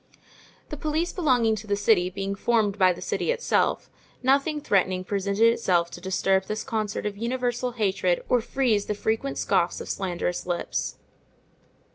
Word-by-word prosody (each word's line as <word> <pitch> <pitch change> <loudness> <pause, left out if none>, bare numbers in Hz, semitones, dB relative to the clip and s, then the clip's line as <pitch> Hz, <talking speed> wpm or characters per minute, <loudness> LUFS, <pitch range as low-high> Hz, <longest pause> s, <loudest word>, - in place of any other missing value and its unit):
The 300 - -5
police 310 +4 -1
belonging 250 - +2
to 215 +1 -9
the 205 - +1
city 200 -3 +3
being 195 +1 -3
formed 210 -1 +1
by 185 -1 +6
the 175 - -6
city - - -2
itself, 485 0 +1 0.4
nothing 280 +4 +2
threatening 185 -7 +1
presented 200 +2 -1
itself 185 -7 +3
to 175 - -9
disturb 190 +1 +1
this 215 +1 -3
concert 215 -2 -3
of 205 -1 -3
universal 245 +1 -2
hatred 190 -5 0
or 250 -2 +3
freeze 225 -4 0
the 210 - -1
frequent 225 +6 -2
scoffs 175 0 +1
of - - -7
slanderous 180 -2 -3
lips. 170 - -2
210 Hz, 155 wpm, -25 LUFS, 190-245 Hz, 0.4 s, by